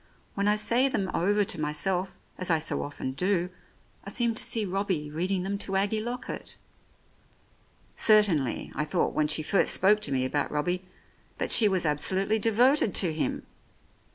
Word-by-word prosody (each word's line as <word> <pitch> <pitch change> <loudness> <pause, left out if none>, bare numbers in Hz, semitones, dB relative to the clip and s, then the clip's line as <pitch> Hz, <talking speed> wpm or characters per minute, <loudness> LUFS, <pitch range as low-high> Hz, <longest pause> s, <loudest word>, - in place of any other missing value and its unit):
When 200 +1 -1
I 210 - +3
say 235 +5 +3
them 200 -8 -2
over 205 +4 +1
to 175 - -3
myself, 180 +5 -2 0.2
as 185 - -2
I 165 - +3
so 155 - -2
often 145 -2 -5
do, 180 +4 -1 0.5
I - - -8
seem 235 -2 +1
to - - -5
see 225 -2 0
Robbie 185 -6 -2
reading 180 +4 -1
them 200 +1 -3
to 195 -1 -3
Aggie 205 +3 +1
Lockett. 240 +3 -6 1.4
Certainly, 195 - +2
I 150 - -2
thought, 150 - -1
when 155 -1 +1
she 155 +1 -1
first 195 +5 +2
spoke 205 +3 +3
to 145 - -2
me 130 -1 0
about 145 +2 -2
Robbie, 175 +5 -2 0.5
that - - -2
she 220 - +7
was 190 -4 +1
absolutely 190 +8 +1
devoted 230 +2 +2
to 175 -5 +2
him. 155 - -3
190 Hz, 170 wpm, -27 LUFS, 155-210 Hz, 1.4 s, she